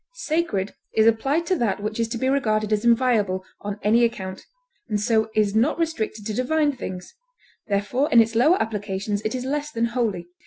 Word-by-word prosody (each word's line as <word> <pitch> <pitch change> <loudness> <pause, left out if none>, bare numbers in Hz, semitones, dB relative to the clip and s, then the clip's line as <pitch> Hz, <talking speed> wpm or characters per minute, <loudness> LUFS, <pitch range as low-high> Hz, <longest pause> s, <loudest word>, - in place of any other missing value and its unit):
Sacred 310 - -1 0.2
is 220 - +4
applied 270 +9 +2
to 370 - +1
that 210 -5 0
which 215 +2 -4
is 230 - +1
to 230 +1 -4
be 260 - -1
regarded 215 -6 +1
as 210 +1 0
inviolable 230 -6 +2
on 205 0 -5
any 225 +4 +4
account, 190 -5 -3 0.4
and 210 -1 0
so 220 0 +1
is 210 -2 +2
not 235 +8 +2
restricted 225 -11 -2
to 215 - -3
divine 290 +5 +1
things; 180 -7 -7 0.5
therefore 205 +8 0
in 235 - +7
its 225 0 +3
lower 300 +11 +4
applications 205 -1 -2
it 215 +3 -2
is 255 0 -4
less 295 +2 -2
than 230 -5 -1
holy. 210 -8 -1
225 Hz, 190 wpm, -23 LUFS, 205-255 Hz, 0.5 s, in